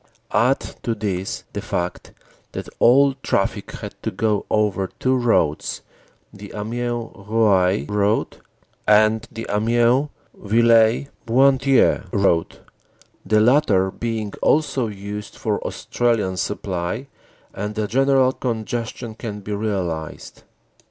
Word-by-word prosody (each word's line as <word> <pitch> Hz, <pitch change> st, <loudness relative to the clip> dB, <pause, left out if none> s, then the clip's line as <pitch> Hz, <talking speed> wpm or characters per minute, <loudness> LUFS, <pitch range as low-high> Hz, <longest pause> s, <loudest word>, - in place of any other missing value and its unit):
Add 120 Hz, +6 st, +3 dB, 0.2 s
to 115 Hz, -2 st, -1 dB
this 95 Hz, -3 st, -3 dB
the -, -, -3 dB
fact 90 Hz, 0 st, -4 dB, 0.4 s
that -, -, -5 dB
all 135 Hz, +3 st, +5 dB
traffic -, -, -1 dB
had -, -, -7 dB
to -, -, -2 dB
go 105 Hz, -2 st, -1 dB
over 105 Hz, -3 st, +1 dB
two 130 Hz, 0 st, +2 dB
roads 115 Hz, -, +1 dB, 0.5 s
the 100 Hz, 0 st, -10 dB
Amiens 120 Hz, +2 st, -3 dB, 0.2 s
Roye 100 Hz, -4 st, +3 dB
road 105 Hz, +1 st, 0 dB, 0.5 s
and 110 Hz, +2 st, +4 dB
the 115 Hz, -1 st, -6 dB
Amiens 120 Hz, +6 st, +2 dB, 0.2 s
Villers 115 Hz, +3 st, +3 dB, 0.2 s
Bretonneux 135 Hz, +2 st, +3 dB
road, 95 Hz, -6 st, +1 dB, 0.6 s
the 110 Hz, 0 st, +2 dB
latter 110 Hz, -7 st, +3 dB
being 110 Hz, -2 st, -4 dB
also 140 Hz, -5 st, +2 dB
used 105 Hz, 0 st, -7 dB
for -, -, -1 dB
Australian 115 Hz, -6 st, -1 dB
supply 90 Hz, +4 st, -3 dB, 0.5 s
and 105 Hz, +2 st, -4 dB
the 105 Hz, -1 st, -1 dB
general 135 Hz, +2 st, +3 dB
congestion 115 Hz, -1 st, -4 dB
can 110 Hz, -2 st, -6 dB
be 105 Hz, +1 st, -5 dB
realized. 95 Hz, -7 st, -4 dB
110 Hz, 110 wpm, -21 LUFS, 100-120 Hz, 0.6 s, all